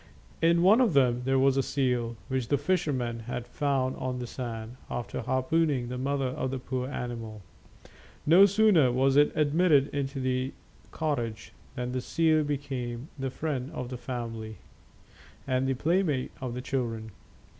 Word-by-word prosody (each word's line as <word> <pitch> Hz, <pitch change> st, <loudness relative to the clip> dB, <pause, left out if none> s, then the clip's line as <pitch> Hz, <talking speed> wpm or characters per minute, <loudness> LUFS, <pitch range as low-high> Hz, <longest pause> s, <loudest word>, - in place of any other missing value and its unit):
In 170 Hz, +1 st, +4 dB
one 210 Hz, +7 st, +6 dB
of 230 Hz, -9 st, +3 dB
them 125 Hz, -3 st, +4 dB
there 135 Hz, 0 st, +2 dB
was 135 Hz, 0 st, +3 dB
a -, -, +4 dB
seal, 125 Hz, -4 st, 0 dB
which 130 Hz, -3 st, -1 dB
the 145 Hz, -, +2 dB
fisherman 140 Hz, -7 st, -1 dB
had 120 Hz, +1 st, -5 dB
found 130 Hz, 0 st, 0 dB
on 130 Hz, -1 st, -3 dB
the 125 Hz, -, -4 dB
sand, 115 Hz, -1 st, -6 dB
after 120 Hz, -, -4 dB
harpooning 130 Hz, +1 st, +1 dB
the 125 Hz, -, -4 dB
mother 135 Hz, 0 st, 0 dB
of 130 Hz, 0 st, -3 dB
the 135 Hz, -, -3 dB
poor 130 Hz, 0 st, -3 dB
animal. 115 Hz, -6 st, -5 dB, 0.8 s
No 180 Hz, +6 st, +8 dB
sooner 200 Hz, -, +4 dB
was 135 Hz, +2 st, +2 dB
it 145 Hz, +1 st, +5 dB
admitted 150 Hz, -1 st, +3 dB
into 140 Hz, -1 st, -3 dB
the 130 Hz, 0 st, -1 dB, 0.4 s
cottage 115 Hz, -8 st, -3 dB, 0.2 s
than 125 Hz, -1 st, -3 dB
the 130 Hz, 0 st, -2 dB
seal 160 Hz, +2 st, +2 dB
became 135 Hz, -3 st, -4 dB
the 135 Hz, 0 st, -1 dB
friend 135 Hz, -2 st, -3 dB
of 125 Hz, -4 st, -4 dB
the 125 Hz, -, -5 dB
family 115 Hz, -3 st, -5 dB, 0.9 s
and 130 Hz, +1 st, 0 dB
the 135 Hz, -, +1 dB
playmate 155 Hz, -2 st, +1 dB
of 125 Hz, -2 st, -4 dB
the 125 Hz, -, -4 dB
children. 115 Hz, -4 st, -3 dB
130 Hz, 160 wpm, -28 LUFS, 125-145 Hz, 0.9 s, No